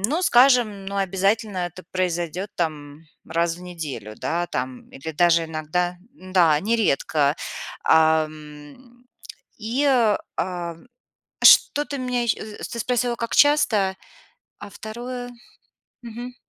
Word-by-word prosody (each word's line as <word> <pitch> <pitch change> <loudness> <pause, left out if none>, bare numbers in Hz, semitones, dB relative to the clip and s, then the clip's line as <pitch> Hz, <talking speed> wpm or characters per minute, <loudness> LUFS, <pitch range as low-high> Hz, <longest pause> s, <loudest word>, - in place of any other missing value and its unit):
но, 285 - 0
скажем, 240 - +4
но 200 0 -4
обязательно 195 0 0
это 175 +1 -11
произойдет 180 +1 -2
там 150 -3 -4 0.3
раз 170 0 0
в - - -13
неделю, 155 - -7
да, 175 +2 -2
там 125 -3 -5
или 150 +4 -8
даже 170 +1 +3
иногда 160 +3 -2 0.2
Да, 180 - +2
нередко. 160 -8 +1 0.5
Ам, 155 - 0 0.5
и, 235 +6 -1 0.5
а, 175 -2 -3 0.7
что-то 290 -1 +5
меня 250 -1 -1
е 235 - -3
э, 215 -1 -9
ты 235 - -6
спросила, 245 +1 0
как 230 0 -4
часто, 220 -10 +3 0.6
а 205 - -9
2? 245 +4 -7 0.7
Мгм. 240 +2 -8
185 Hz, 115 wpm, -23 LUFS, 160-235 Hz, 0.7 s, что-то